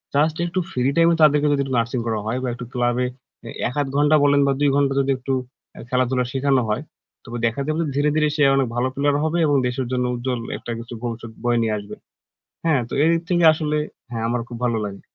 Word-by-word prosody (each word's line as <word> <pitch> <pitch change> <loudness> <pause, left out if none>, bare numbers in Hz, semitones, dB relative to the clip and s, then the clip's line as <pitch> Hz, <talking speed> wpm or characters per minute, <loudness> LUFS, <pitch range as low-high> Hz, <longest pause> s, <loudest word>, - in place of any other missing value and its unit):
Just 155 +2 +3
একটু 175 +2 -2
free 125 - -2
time 165 0 +5
এ - - +2
তাদেরকে 150 -1 +5
যদি 140 - +1
নার্সিং 115 +2 0
করা 110 -1 0
হয় 125 +4 -1
বা - - -1
একটু 125 0 -7
ক্লাবে 120 0 +1 0.6
১ 125 - -5
১/২ 140 - -2
ঘন্টা 150 +2 +4
বলেন 145 0 +4
বা 140 - +3
২ 145 -1 +3
ঘন্টা 140 -1 +2
যদি 135 0 +1
একটু 135 +1 -3 0.4
আ - - -10
খেলাধুলা 125 0 +1
শেখানো 135 -1 +2
হয়, 105 - 0 0.4
তবে 120 -1 -6
দেখা 115 +4 0
যাবে 155 +2 0
ধীরে, 145 +1 +2
ধীরে, 150 -1 +3
সে 150 - +2
অনেক 135 -2 +2
ভালো 120 +1 +1
প্লেয়ার 145 +1 +1
হবে 160 +2 0
এবং 145 -1 +2
দেশের 125 +1 -2
জন্য 125 -1 0
উজ্জ্বল 125 0 -2 0.2
একটা - - -7
কিছু 115 +1 -9
ভবিষ্যৎ 115 -1 -5
বয়ে 120 -1 +2
নিয়ে 110 -1 0
আসবে। 100 0 -8 0.7
হ্যাঁ? 155 -5 +3
তো - - -11
এইদিক 165 +1 +3
থেকে 175 -2 +2
আসলে 150 -1 -1 0.3
হ্যাঁ 115 -1 -3
আমার 120 0 0
খুব 120 - -7
ভালো 120 -2 +1
লাগে। 100 -1 -8
130 Hz, 220 wpm, -22 LUFS, 120-145 Hz, 0.7 s, time